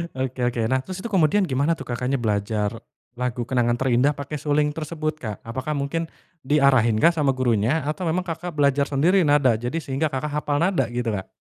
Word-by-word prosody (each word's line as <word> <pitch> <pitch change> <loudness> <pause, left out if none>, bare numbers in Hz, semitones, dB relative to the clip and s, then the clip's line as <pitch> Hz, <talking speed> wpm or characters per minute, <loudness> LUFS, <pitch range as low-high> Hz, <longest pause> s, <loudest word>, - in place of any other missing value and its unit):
Oke 130 -1 -3
oke. 120 -1 -1
Nah, 130 0 +2
terus 190 0 -7
itu 235 - -5
kemudian 190 +1 +3
gimana 145 +1 +1
tuh, - - -8
Kakaknya, 125 +2 -1
belajar 105 -1 -1 0.5
lagu 125 -1 -2
Kenangan 120 -2 +2
Terindah 130 +3 +2
pakai 145 +2 -6
suling 150 +1 +1
tersebut, 155 0 -4
Kak? 110 -8 -5
Apakah 130 +6 -4
mungkin 145 +4 -2 0.4
diarahin 130 -6 +4
kah 170 - +7
sama 145 -5 +1
gurunya 125 +4 +1
atau 155 +5 -3
memang, 175 +3 0
Kakak, 170 0 -5
belajar 140 -1 +2
sendiri 170 +6 +3
nada, 140 -6 +4
jadi 120 +6 -4
sehingga, 140 +3 -1
Kakak, 145 +3 -3
hafal 145 0 -1
nada 170 -8 +2
gitu, 120 -2 -1
Kak? 95 -2 -4
140 Hz, 190 wpm, -23 LUFS, 125-155 Hz, 0.5 s, kah